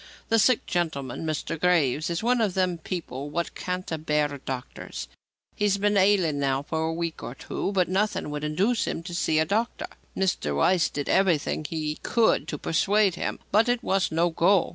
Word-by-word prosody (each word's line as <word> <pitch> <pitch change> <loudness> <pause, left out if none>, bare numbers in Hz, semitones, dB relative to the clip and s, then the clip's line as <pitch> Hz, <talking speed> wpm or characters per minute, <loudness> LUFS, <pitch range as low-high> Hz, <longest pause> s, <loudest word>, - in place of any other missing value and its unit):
The 225 - +4
sick 245 +3 +3
gentleman, 160 -4 -2
Mr. 155 +1 -3
Graves, 160 -4 +2
is 170 +4 -2
one 245 0 +2
of 200 -4 0
them 185 -3 +1
people 150 -6 -5
what 170 +3 -2
can't 180 -1 -4
abear 150 -2 0
doctors. 130 -2 -6 0.5
He's 205 -1 +2
been 205 +1 +1
ailing 190 -7 +3
now 135 0 0
for 160 +1 -2
a - - -1
week 165 -1 -3
or 120 - -6
two, 195 - -3
but 185 -2 +2
nothing 195 -4 0
would 150 0 -4
induce 195 +10 +1
him 165 - -3
to 175 0 -7
see 160 -2 +1
a 155 - +3
doctor. 225 +7 -1 0.3
Mr. 175 - 0
Weiss 175 - +3
did 145 -1 -4
everything 170 -5 +2
he 155 -2 -3
could 230 -2 +2
to 150 - -3
persuade 200 +6 +2
him, - - -3
but 220 +4 +4
it 245 0 +1
was 195 -3 +1
no 165 +2 +2
go. 175 +3 +3
170 Hz, 185 wpm, -26 LUFS, 155-195 Hz, 0.5 s, The